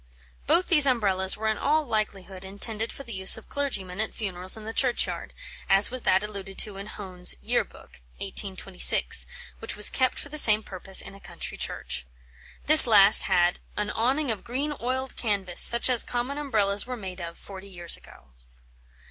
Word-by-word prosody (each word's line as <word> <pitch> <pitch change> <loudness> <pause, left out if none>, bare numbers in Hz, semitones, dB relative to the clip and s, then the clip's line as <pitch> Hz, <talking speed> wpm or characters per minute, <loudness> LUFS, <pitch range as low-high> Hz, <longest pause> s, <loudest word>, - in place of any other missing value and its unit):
Both 365 - +1
these 300 -6 +5
Umbrellas 195 -7 0
were 220 +1 -5
in 220 -1 -2
all 305 +1 -1
likelihood 200 -5 -6
intended 210 +3 -5
for 275 - -9
the 235 -3 -10
use 190 +2 +4
of 225 - -15
clergymen 200 -10 -5
at 220 - -5
funerals 185 -2 -3
in 215 - -12
the 225 - -8
churchyard, 250 -1 -1 0.4
as 195 +4 +3
was 255 0 -6
that 190 -1 0
alluded 200 -2 -10
to 205 -3 -2
in 200 +1 -9
Hone's 185 -4 -4
Year - - -2
Book - - -20 0.2
(1826) - - 0 0.3
which - - -6
was 210 - +5
kept 260 -1 -2
for 285 - -8
the 305 +1 -2
same 215 -4 +6
purpose 190 0 -2
in - - -13
a 195 - -16
country 175 -2 -8
church. 60 - -4 0.6
This 305 -3 +11
last 205 -2 +7
had 175 0 0 0.2
"an 210 0 -3
awning 260 +4 -2
of 215 - -7
green 280 +5 -5
oiled 260 +2 -5
canvas, 200 -6 -4
such 235 0 +5
as 250 -3 +5
common 250 +4 -5
Umbrellas 210 -7 -2
were 250 -1 -7
made 190 -3 -10
of, 170 0 -9
forty 195 0 -12
years 175 -2 -1
ago." 65 - -16
210 Hz, 180 wpm, -24 LUFS, 190-245 Hz, 0.6 s, This